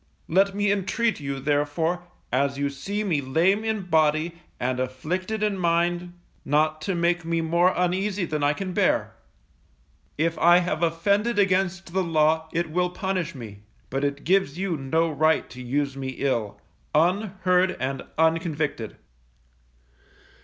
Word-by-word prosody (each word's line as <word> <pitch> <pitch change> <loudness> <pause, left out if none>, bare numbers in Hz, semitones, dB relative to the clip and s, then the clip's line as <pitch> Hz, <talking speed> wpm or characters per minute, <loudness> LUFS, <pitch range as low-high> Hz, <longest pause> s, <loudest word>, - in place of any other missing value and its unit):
Let 195 +3 +2
me 205 0 +2
intreat 210 +3 0
you, 140 -1 -4
therefore, 150 +5 0 0.3
as 140 +1 +1
you 140 0 -1
see 200 +10 -3
me 165 -8 0
lame 170 +10 +2
in 220 -2 -1
body, 160 -1 +2 0.3
and 125 0 -1
afflicted 180 - -3
in 205 -2 0
mind, 175 0 0 0.3
not 155 +2 +1
to 185 +4 -2
make 170 0 +1
me 165 0 0
more 170 +3 +3
uneasy 185 +2 0
than 150 -3 -2
I 145 +1 +3
can 185 +3 -5
bear. - - +1 1.0
If 165 +2 0
I 175 +1 +7
have 175 -3 -1
offended 200 +8 +1
against 190 -2 +1
the 190 - +2
law 160 -1 +2
it 170 -1 -2
will 180 +2 +1
punish 185 -3 -3
me, 110 -6 -9 0.3
but 135 +2 -1
it 140 0 -2
gives 185 -4 +2
you 190 -2 -1
no 160 +4 0
right 155 +1 +2
to 125 - -9
use 140 +2 -1
me 135 -1 -5
ill, 115 -7 -1 0.4
unheard, 185 +1 +2
and 130 +1 -2 0.2
unconvicted. 160 - 0
165 Hz, 145 wpm, -25 LUFS, 145-185 Hz, 1.0 s, I